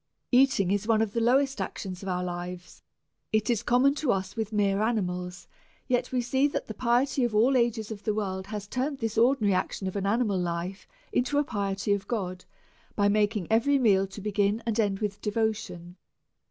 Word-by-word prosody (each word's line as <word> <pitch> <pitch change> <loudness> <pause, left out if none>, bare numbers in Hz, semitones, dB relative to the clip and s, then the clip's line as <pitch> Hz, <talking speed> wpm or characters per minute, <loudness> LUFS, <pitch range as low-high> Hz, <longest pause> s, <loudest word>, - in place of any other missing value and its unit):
Eating 250 -7 +4
is 205 +1 0
one 225 -2 +3
of 210 -2 -4
the 230 - 0
lowest 270 +4 +2
actions 185 -3 -5
of 195 - -5
our 180 0 -1
lives, 180 0 -6 0.5
it 215 +2 +1
is 230 - 0
common 255 +3 +3
to 290 -3 0
us 190 0 -2
with 220 -2 -3
mere 200 -1 +1
animals, 180 -5 -2 0.4
yet 245 -1 0
we 255 -1 +1
see 265 +4 +2
that 290 - -3
the 220 - -6
piety 250 +4 +1
of 235 -3 0
all 245 +6 +4
ages 230 -3 +1
of 205 -2 -6
the 215 - -1
world 190 -3 -3
has 210 -1 -5
turned 270 +5 -2
this 225 -3 -3
ordi 240 +3 +3
nary 205 -2 +3
action 190 +1 -2
of 190 - -3
animal 200 0 +1
life 175 +2 -4 0.3
into 260 -2 +1
a 290 - +4
piety 200 -4 -1
to 200 - -5
God, 185 -5 -4 0.5
by 205 -1 +3
mak^ 210 +1 +2
ing 195 -5 -2
every 255 +6 +4
meal 195 -6 +3
to 195 +2 -10
begin 205 +2 0
and 230 -1 -1
end 200 -2 +1
with 205 -1 -3
devotion. 210 -5 -2
210 Hz, 200 wpm, -27 LUFS, 195-240 Hz, 0.5 s, Eating